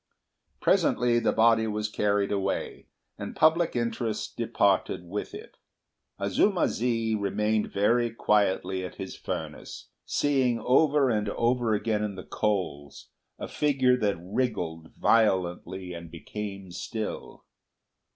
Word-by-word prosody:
Presently 120 0 +3
the - - +1
body 115 0 +4
was 105 0 -2
carried 105 -1 0
away, 100 -1 -2 0.3
and - - -6
public 160 0 +3
interest 115 -2 -2
departed 90 - +1
with 100 - -5
it. 435 +4 -11 0.6
Azuma 195 -4 +2
zi 115 -1 0
remained 105 +1 0
very 120 +4 +2
quietly 100 -4 +1
at 90 - -7
his 95 -1 -7
furnace, - - -6
seeing 135 -4 +1
over 140 +1 +3
and 105 -2 0
over 120 0 +1
again 105 0 -1
in 105 -2 -3
the 95 - -8
coals 90 -10 -3 0.3
a - - -6
figure 135 -4 +2
that 105 -6 0
wriggled 90 -5 -3
violently 95 -4 +1
and 85 -1 -8
became 100 +2 -7
still. 110 +4 -6
105 Hz, 120 wpm, -27 LUFS, 95-120 Hz, 0.6 s, body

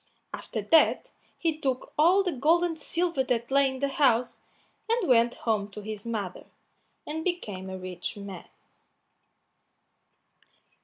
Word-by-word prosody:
After - - -5
that 325 - +4 0.3
he 320 -2 -1
took 265 -4 -2
all 355 +6 +5
the 365 - -1
gold 320 +5 +3
and 340 -2 0
silver 340 -5 0
that 240 -1 -1
lay 275 0 +4
in 265 - -6
the 280 - +2
house, 255 -4 +2 0.5
and 460 -4 +1
went 240 -2 +4
home 210 -3 +1
to 210 - -7
his 215 +1 -6
mother, 205 -5 -4 0.6
and 315 +2 -4
became 210 - -3
a 190 - -5
rich 185 +2 -6
man. 200 -3 -8
260 Hz, 140 wpm, -27 LUFS, 210-320 Hz, 0.6 s, all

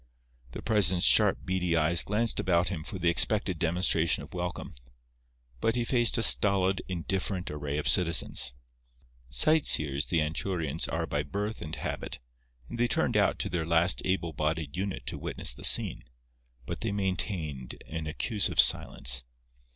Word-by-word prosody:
The - - -8
president's 95 -5 +3
sharp, - - +4
beady 90 -2 -1
eyes 80 +2 +2
glanced 110 +3 0
about 85 -1 +1
him 80 -5 -5
for 95 - -6
the 90 -1 -2
expected 95 -1 +1
demonstration 85 -1 +1
of - - -14
welcome; 90 0 -6 0.9
but 115 - 0
he 120 -1 -1
faced 120 -1 +1
a 115 - +1
stolid, 95 -3 +3
indifferent 95 +1 -4
array 75 -1 -5
of 75 - -3
citizens. 85 -8 +3 0.7
Sight 155 - +2
seers 70 -1 +2
the 85 - 0
Anchurians 80 0 -2
are 80 0 -2
by 75 -1 -2
birth 100 +9 -5
and 80 -1 -5
habit, - - -6 0.5
and 120 - -8
they 120 - +2
turned - - -1
out - - +2
to - - -3
their 85 -2 -2
last 85 +2 +1
able 90 -3 -2
bodied 75 -1 -3
unit 95 +1 -5
to - - -6
witness - - -1
the - - -13
scene; - - +5 0.6
but 85 +6 -7
they 115 - -2
maintained 85 - -4
an 80 -1 -6
accusive 100 +6 -2
silence. 60 -3 +3
85 Hz, 160 wpm, -28 LUFS, 80-95 Hz, 0.9 s, scene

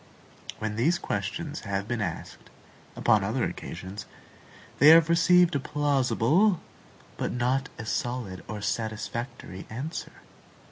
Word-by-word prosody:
When 110 -1 -3
these 165 +9 +3
questions 145 - -3
have 100 -1 -3
been 120 -1 -2
asked, 90 -5 -5 0.5
upon - - +3
other - - -1
occasions, 95 +4 -6 0.7
they 145 - +7
have 165 +1 +8
received 175 +1 +5
a 140 - +1
plausible, 145 - +2 0.6
but - - -2
not 130 +3 0
a 110 - -6
solid 115 -5 -3
or 105 -1 -5
satisfactory 110 -1 -4
answer. 135 +9 -5
120 Hz, 120 wpm, -27 LUFS, 105-150 Hz, 0.7 s, have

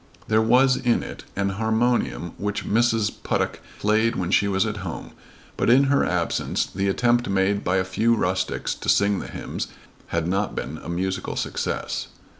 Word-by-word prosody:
There 110 0 +3
was 125 +3 +4
in 120 -2 +1
it - - -8
an 100 0 0
harmonium 110 - 0
which 105 +1 -2
Mrs. 115 -1 +2
Puttock - - -1 0.2
played 110 +3 +2
when 90 -1 -2
she 100 - +4
was 95 0 +1
at 105 -1 -3
home, 95 -5 -6 0.5
but - - +1
in 130 +4 +6
her 140 - +3
absence - - 0
the 100 +1 -2
attempt 120 +4 +2
made 100 +1 +1
by 90 - +1
a 95 - +2
few 110 +5 +2
rustics 95 -3 -1
to - - -5
sing 100 -1 +3
the - - -6
hymns - - -5 0.4
had 85 -1 -1
not 100 +3 -1
been 75 +3 -4
a - - -8
musical 95 +2 -2
success. - - -2
100 Hz, 175 wpm, -24 LUFS, 95-115 Hz, 0.5 s, in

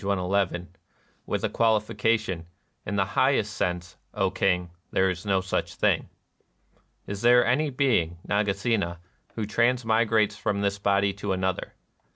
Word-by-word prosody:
Ill), 95 -2 0 0.6
with - - -2
a - - +1
qualification: 110 -3 +1
^^ - - -15 0.4
In 100 - -2
the 95 -1 +2
highest 110 -2 +1
sense, 90 -1 -3 0.2
O 95 -2 +1
King, 90 -2 0 0.2
there 95 0 +2
is 90 +3 -7
no 95 -1 +2
such 95 - -2
thing."] - - +1 0.5
" - - -40
Is 100 0 -5
there 120 +1 +6
any 145 +6 +2
being, 125 - +1
Nagasena, 100 -3 0 0.4
who 110 - -2
transmi 115 0 +2
grates 105 -2 +2
from 100 -1 -2
this 100 0 0
body 100 0 +2
to 100 0 -3
another 95 0 -2
100 Hz, 150 wpm, -26 LUFS, 95-110 Hz, 0.6 s, there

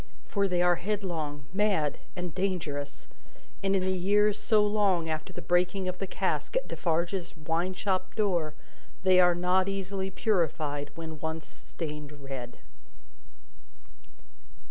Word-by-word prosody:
For, 200 -1 +1
they 180 -1 +2
are 175 -1 +4
headlong, 170 -7 -3
mad, 190 -8 +2 0.2
and 180 -3 -4
dangerous; 165 -7 -2 0.5
and 195 0 +2
in 190 - +2
the 190 - +1
years 205 +3 +3
so 215 -2 +4
long 195 -6 +2
after 155 0 -3
the - - -7
breaking 180 +2 +2
of 185 0 -3
the 195 - -2
cask - - -1
at - - +1
Defarge's 170 +1 -1
wine 165 +4 -1
shop 185 -1 -1
door, 175 -8 +1 0.5
they 185 -1 +6
are 175 -1 +6
not 180 +2 +2
easily 195 0 -2
purified 155 -8 0
when 160 -2 -6
once 160 0 -3
stained 150 -2 -6
red. 135 -4 -7
180 Hz, 135 wpm, -29 LUFS, 160-195 Hz, 0.5 s, they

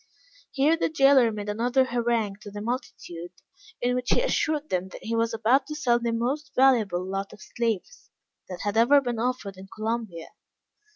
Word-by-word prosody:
Here 290 +4 +3
the 330 - 0
jailor 275 -5 +5
made 210 -1 -6
another 240 +5 +1
harangue 235 -4 -1
to 205 - -9
the 205 +1 -7
multitude, 180 -7 -5 0.5
in 245 +1 0
which 250 0 -2
he - - +3
assured 310 -11 0
them 185 0 0
that - - -11
he 230 +1 -2
was 230 0 +1
just 225 -1 -5
about 260 +5 +3
to 305 - -5
sell 245 -6 +2
the 235 -1 -1
most 275 +6 -2
valuable 220 -9 +3
lot 195 +1 -4
of - - -14
slaves 230 - -4 0.4
that 180 - -6
had 205 +1 -2
ever 255 +5 +6
been 245 -4 -3
offered 235 -5 -2
in 190 +1 -11
Columbia. 215 -5 -4
235 Hz, 185 wpm, -26 LUFS, 205-260 Hz, 0.5 s, ever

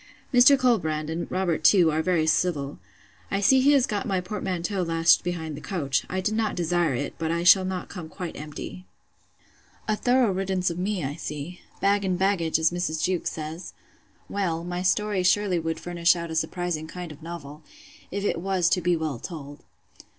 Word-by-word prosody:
Mr. 250 +3 +7
Colbrand, 160 - +1
and 165 +2 -4
Robert 180 -4 0
too, 175 -2 +6
are 155 +1 0
very 170 -2 +1
civil. 155 -3 0 0.5
I 195 - 0
see 260 +6 +5
he 285 +3 +5
has 270 -3 +4
got 215 +3 -3
my 190 -3 +1
portmanteau 185 0 -3
lashed 165 -1 +3
behind 160 -3 -4
the 145 - -9
coach. 140 -4 -1
I 185 +1 -2
did 210 +3 -1
not 220 -1 0
desire 175 -4 +1
it; 140 +4 -3
but 160 -1 -1
I 170 +1 0
shall 185 +1 +7
not 185 -1 -4
come 175 -5 -8
quite 180 -1 -6
empty. 155 +5 -8 1.0
A 215 - +2
thorough 245 -1 +2
riddance 190 -1 -1
of 170 - -5
me, 190 -1 -1
I 135 +1 -2
see!—Bag 180 +6 -2
and 185 -2 0
baggage! 185 -4 +1
as 160 +1 +2
Mrs. 175 -3 -2
Jewkes 185 -2 0
says. 160 +3 -7 0.5
Well, 170 -5 -2
my 175 +1 -3
story 200 +1 +1
surely 185 0 +2
would 165 0 -3
furnish 170 +1 +2
out 170 -1 -5
a - - -4
surprising 165 -1 -2
kind 175 0 -7
of 150 +1 -12
novel, 155 -3 -8 0.5
if 200 +1 -4
it 170 -4 -1
was 185 -2 +1
to 180 - +1
be 175 0 +2
well 155 -6 -3
told. 145 -2 -8
175 Hz, 185 wpm, -25 LUFS, 160-190 Hz, 1.0 s, Mr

